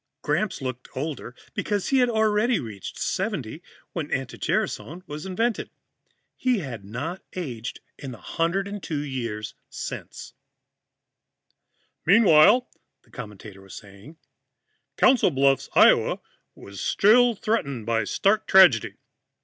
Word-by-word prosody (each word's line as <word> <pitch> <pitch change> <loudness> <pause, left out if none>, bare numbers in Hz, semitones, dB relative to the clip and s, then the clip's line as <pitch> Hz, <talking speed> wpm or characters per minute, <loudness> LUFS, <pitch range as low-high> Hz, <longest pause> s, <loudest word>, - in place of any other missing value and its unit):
Gramps 210 -9 -1
looked 130 -1 -5
older 135 -3 -5 0.2
because 205 -2 -2
he 270 - +3
had 250 -1 +3
already 220 +1 +2
reached 105 -6 -8
70 190 - -3 0.3
when 160 -4 -4
anti 135 - -3
gerasone 175 +5 -2
was 150 +2 -7
invented. 225 +5 -1 0.7
He 255 -2 +1
had 130 - -6
not 135 - -5
aged 125 -10 -5 0.2
in 135 - -7
the 120 - -8
102 175 - -2
years 120 -7 -4 0.2
since. - - -7 1.7
"Meanwhile," 205 +4 +6 0.4
the - - -27
commentator 105 -4 -10
was 95 -1 -12
saying, 105 +10 -13 0.8
"Council 260 -6 +5
Bluffs, 135 -2 +2
Iowa, - - +5 0.4
was 100 -1 -10
still 240 +3 +4
threatened 140 - -2
by 115 -2 0
stark 200 - +1
tragedy. 180 - +6
155 Hz, 115 wpm, -25 LUFS, -, 1.7 s, Meanwhile